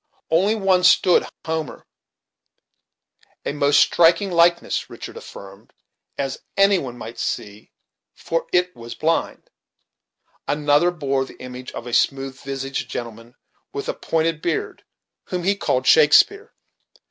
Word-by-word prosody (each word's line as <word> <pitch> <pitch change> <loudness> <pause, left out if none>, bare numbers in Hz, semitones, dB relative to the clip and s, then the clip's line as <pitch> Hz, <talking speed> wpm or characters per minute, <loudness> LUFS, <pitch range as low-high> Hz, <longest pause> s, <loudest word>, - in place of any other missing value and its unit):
On 200 +6 +2
one 185 -2 +3
stood 180 0 +4 0.2
Homer, 160 -3 -4 1.6
a - - -2
most 145 0 +3
striking 175 +3 +4
likeness, 170 0 +2
Richard - - -9
affirmed, 100 0 -12 0.4
"as 135 -1 -3 0.2
any 195 -1 +5
one 125 -5 -7
might 115 0 -9
see, 105 +1 -5 0.4
for 165 0 -3
it 180 0 +1
was 115 0 -9
blind," 160 +1 -2 1.0
Another 145 +3 +2
bore 140 -6 -1
the - - -15
image 125 0 -8
of - - -7
a 120 - -7
smooth 135 +1 0
visaged 135 -1 -5
gentleman 115 0 -7 0.4
with - - -5
a - - -1
pointed 165 -1 -1
beard, 170 -2 -3 0.4
whom 180 -1 -4
he 200 +3 +2
called 130 -9 -1
Shakespeare. 160 - +5
150 Hz, 125 wpm, -21 LUFS, 130-175 Hz, 1.6 s, any